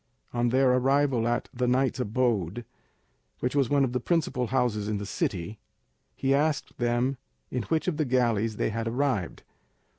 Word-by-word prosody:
On 120 0 +1
their 130 +1 +4
arrival 130 -2 +2
at 120 +1 0
the 125 0 0
knight's 130 +1 +1
abode, 115 -3 0 0.7
which 125 +3 -2
was 140 -4 +2
one 145 -1 +3
of 125 -2 -1
the 125 - +1
principal 130 -4 0
houses 115 -4 0
in 105 -1 -1
the 100 - -5
city, 95 0 -3 0.6
he 135 0 +1
asked 150 +1 0
them 120 +2 +1 0.3
in 125 - -1
which 160 +1 0
of 170 -5 0
the 155 - +1
galleys 115 -4 +1
they 110 - -1
had 115 +1 -3
arrived. 120 -6 -1
125 Hz, 170 wpm, -27 LUFS, 115-135 Hz, 0.7 s, their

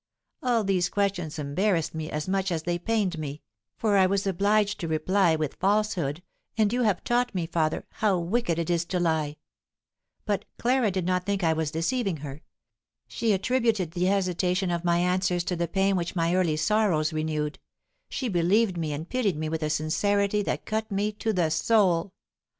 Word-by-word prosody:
All 240 -3 +2
these 190 -3 +1
questions 185 -6 -1
embarrassed 165 +4 0
as 155 0 -4
much 190 0 0
as 160 -2 -1
they 175 0 -1
pained 195 -4 0
me, 150 -1 -6 0.3
for 210 -3 +2
I 190 -1 +5
was 195 +1 0
obliged 205 +2 +1
to 170 - -3
reply 165 +2 +2
with 155 -3 -3
falsehood, 190 -6 0 0.3
and 215 0 +2
you 250 - +1
have 210 -6 +1
taught 245 -2 0
me, 175 -3 0
father, 160 -1 -1
how 205 -4 0
wicked 175 0 0
it 170 0 -1
is 170 -1 +1
to 180 +1 -2
lie; 160 -3 0 0.9
but 205 -2 -1
Clara 245 -2 +2
did 185 -2 -2
not 180 0 0
think 200 -1 0
that 165 -2 +3
I - - +3
was 160 -1 -1
deceiving 180 - -1
her; 140 +1 -8 0.7
she 230 -2 0
attributed 215 -3 +1
the 175 +1 -1
hesitation 185 -1 +1
of 170 0 -2
my 170 -1 +2
answers 180 0 +1
to 180 - -2
the 170 0 -1
pain 195 +3 +1
which 175 -1 -2
my 165 0 +1
early 175 -4 +2
sorrows 170 -5 +2
renewed; 155 -1 -2 0.5
she 260 - -3
believed 190 +1 +2
me 155 -3 -2
and 155 +3 -5
pitied 220 -9 0
me 155 0 -2
with 160 0 -3
a 155 - -1
sincerity 200 +7 +1
that - - -3
cut 220 0 -2
me 205 +2 0
to 215 +1 -2
the 175 -6 +1
soul. 185 -2 +2
180 Hz, 185 wpm, -26 LUFS, 160-205 Hz, 0.9 s, I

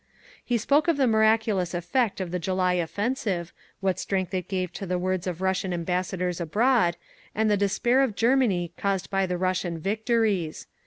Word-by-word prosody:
He 245 - 0
spoke 285 +8 +2
of 335 -3 +2
the 270 - +3
miraculous 220 -5 +2
effect 195 +6 0
of 185 -3 -4
the 180 - -1
July 185 +1 +1
offensive, 185 0 -2 0.3
what 190 -1 0
strength 190 -2 -2
it 185 -2 -2
gave 185 -2 -2
to 195 - -6
the 180 0 0
words 185 0 -1
of 180 -1 -4
Russian 190 -1 0
ambassadors 180 +1 -2
abroad, 205 0 +2 0.4
and 220 0 +2
the - - +4
despair 225 +6 +2
in 255 -7 0
Germany 225 -9 +2
caused 195 -1 -1
by 195 -1 +1
the 180 0 -2
Russian 185 -2 -1
victories. 210 -2 0
190 Hz, 170 wpm, -26 LUFS, 180-220 Hz, 0.4 s, the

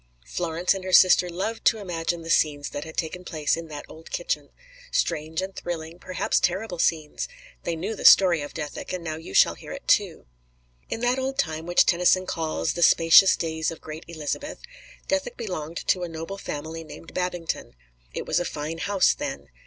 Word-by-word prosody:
Florence 175 +1 0
and 195 -1 -6
her 185 - -4
sister 180 -1 +6
loved 195 +6 -3
to 225 - +5
imagine 175 -4 -3
the 165 - -8
scenes 145 -2 +2
that 145 - -5
had 160 - -10
taken 180 +2 -3
place 155 -5 0
in 165 0 -7
that 150 -2 -8
old 160 +1 -13
kitchen; - - -2 0.4
strange 160 - -1
and 190 0 -6
thrilling, 165 0 -5
perhaps 185 - 0
terrible 190 -3 -1
scenes; 155 -3 0 0.4
they 170 - -1
knew 195 +7 -3
the - - -8
story 175 -5 +7
of 145 - -6
Dethick, 150 -3 -5
and 180 -2 -4
now 160 -1 -3
you 155 -11 -9
shall - - +6
hear - - -11
it - - -9
too. - - +2 0.6
In 225 - -3
that 245 +2 +2
old 265 +1 -2
time 160 - -1
which 175 - +5
Tennyson 180 +2 +3
calls 155 - -1
"the 175 - -4
spacious 170 +3 +7
days 160 -1 -2
of 165 - -7
great 155 +1 -9
Elizabeth," 165 - -5 0.5
Dethick 285 0 -1
belonged 170 -8 -5
to 185 - +3
a 175 - -3
noble 165 +5 -6
family 160 0 -5
named 160 +1 -12
Babington. 180 - -3 0.4
It - - -5
was - - +1
a - - 0
fine 155 0 -4
house 200 0 +3
then. 280 -1 -6
170 Hz, 190 wpm, -25 LUFS, 160-185 Hz, 0.6 s, story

